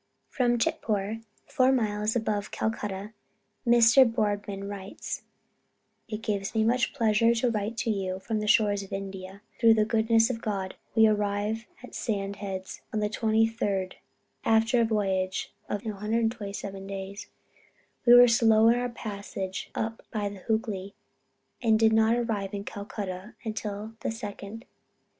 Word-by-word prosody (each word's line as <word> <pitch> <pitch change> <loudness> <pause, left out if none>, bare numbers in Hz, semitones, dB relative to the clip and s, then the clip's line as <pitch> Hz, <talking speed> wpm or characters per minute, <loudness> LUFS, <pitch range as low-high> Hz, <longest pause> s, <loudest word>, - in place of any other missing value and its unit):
From 245 -3 +1
Chitpore 215 -1 -1 0.2
four 260 -2 +3
miles 215 -3 0
above 215 -3 -1
Calcutta, 210 -1 -3 0.5
Mr. 235 +2 +7
Boardman 205 -2 -2
writes: 200 -1 -6 0.9
"It 215 -1 -5
gives 200 0 -2
me 220 - +3
much 240 +2 +2
pleasure 230 -2 +3
to 235 +1 +1
write 215 +1 -2
you 195 -4 -1
from 215 +3 -3
the 210 - -3
shores 205 -1 +3
of 195 - -11
India. 195 0 -6 0.2
Through 230 -1 +6
the 215 -1 +3
goodness 225 +1 +3
of 225 -2 -5
God 195 -3 -3 0.2
we 220 -1 +7
arrived 210 +1 0 0.2
at 250 - -11
Sand 200 -3 -2
Heads 190 -2 -6
on 215 - -1
the 210 0 -1
23d 225 0 +1
ult., 190 -2 0 0.5
after 225 +2 +3
a - - +4
voyage 190 -4 -1 0.2
of 205 +2 -3
127 210 -2 -3
days. 195 0 -6 0.8
We 240 0 +8
were 245 0 +9
slow 225 -1 +5
in 240 +1 +3
our 245 0 -1
passage 200 -4 -5
up 225 0 -3
the 205 -3 -3
Hoogly, 205 -3 -1 0.7
and 225 -3 +4
did 220 0 +4
not 220 +1 +4
arrive 210 -5 -2
in 200 - -4
Calcutta 200 -1 -6
until 215 0 -4
the - - -2
2d 210 -2 -6
inst. 215 +3 -8
215 Hz, 145 wpm, -28 LUFS, 200-225 Hz, 0.9 s, were